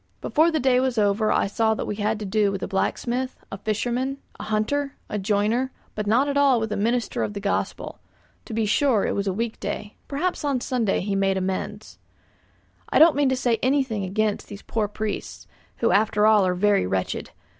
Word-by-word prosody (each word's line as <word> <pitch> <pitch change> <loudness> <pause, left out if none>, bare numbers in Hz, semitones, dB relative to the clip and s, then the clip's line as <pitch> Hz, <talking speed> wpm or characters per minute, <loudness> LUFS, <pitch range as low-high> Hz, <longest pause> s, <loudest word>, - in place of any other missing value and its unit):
Before 320 +2 +3
the 320 -2 0
day 255 -2 +3
was 255 -2 0
over 210 +1 +2
I - - +2
saw 220 +2 +1
that - - -3
we 210 - -4
had 215 +1 0
to - - -3
do 205 +1 +2
with 195 -1 -4
a - - -2
blacksmith, 245 +6 -1
a 195 - -5
fisherman, 245 +6 -1 0.2
a - - -6
hunter, 245 +7 -1
a 210 - -2
joiner, 215 +6 +1 0.2
but 210 -1 -4
not 245 +7 +3
at 285 0 0
all 275 -4 +4
with 220 -1 -3
a - - 0
minister 230 +4 0
of 205 - -2
the - - -3
Gospel. 200 0 -3 0.5
To 230 - -8
be 225 -1 +1
sure, 225 0 +2
it - - 0
was 200 0 -2
a - - +2
week 230 +3 -3
day; 210 - -5
perhaps 330 +6 -2
on 285 -3 +1
a - - -5
Sunday 235 -7 0
he 200 +1 -2
made 195 -1 +1
amends. 190 +3 -4 0.9
I - - +2
don't 325 0 +7
mean 285 -1 +3
to 260 - +1
say 240 -3 +1
anything 255 -6 +1
against 205 +2 -1
these 200 -1 -10
poor 220 -2 -1
priests, 210 +1 -5 0.3
who 230 - +2
after 210 +1 +3
all 215 -3 +5
are 180 - 0
very 200 - +2
wretched. 95 0 -2
220 Hz, 210 wpm, -24 LUFS, 205-255 Hz, 0.9 s, don't